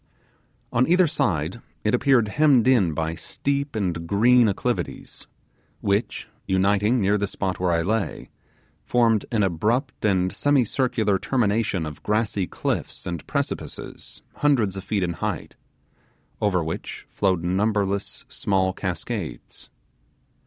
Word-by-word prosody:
On 125 +2 +3
either 180 +2 +5
side 110 - -1 0.2
it 105 - +1
appeared 125 -3 +3
hemmed 140 -2 +4
in 100 -12 +3
by 80 +1 -1
steep 140 - -3
and 85 -5 -2
green 120 +5 +5
acclivities, 100 - -3 0.5
which, 100 +3 -1 0.2
uniting 100 +5 +2
near 100 0 +2
the 100 - 0
spot 95 -1 -3
where 90 0 +1
I 85 -1 +2
lay, 110 +3 -2 0.5
formed 115 -3 +2
an 110 -3 +2
abrupt 110 - 0
and 95 -3 +2
semicircular 125 -7 +1
termination 105 -7 0
of 75 -1 -8
grassy 105 -3 0
cliffs - - -3
and 85 -4 -5
precipices - - -5
hundreds 120 -10 +2
of 95 - -6
feet 100 -1 -1
in 85 -1 -1
height, - - -4 0.9
over 95 -5 +2
which 80 +1 -6
flowed 95 -4 0
numberless 100 +2 -1
small 95 -1 0
cascades. - - -5
105 Hz, 125 wpm, -24 LUFS, 95-120 Hz, 0.9 s, either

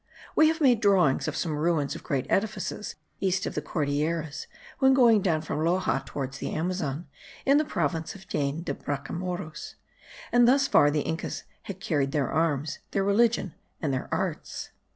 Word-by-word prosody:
We 310 - +6
have 325 +1 +1
made 245 -6 +4
drawings 185 -9 +3
of - - -2
some 160 -4 -1
ruins 150 -2 +1
of - - -7
great 135 -2 -1
edifices 210 0 -1 0.2
east 190 -1 0
of - - -3
the - - -2
Cordilleras, 155 +1 -2 0.3
when 265 -1 +5
going 235 -5 +6
down 165 -5 +1
from 150 - -3
Loxa 170 -4 +1
towards 135 -1 -5
the - - -3
Amazon, 165 -2 -2 0.4
in 275 +2 +5
the 305 - +1
province 160 - -2
of 190 -1 -13
Jaen 145 -2 -1
de - - -2
Bracamoros; 160 +3 -5 0.6
and 240 0 +5
thus 275 +2 +5
far 145 - +5
the 150 0 +1
Incas 160 +2 -4 0.3
had 195 -1 -5
carried 145 -7 0
their 145 -4 0
arms, 150 -2 0
their 195 - 0
religion, 205 -2 +2 0.3
and 145 -4 -1
their 130 - -3
arts. - - -3
165 Hz, 170 wpm, -27 LUFS, 145-200 Hz, 0.6 s, We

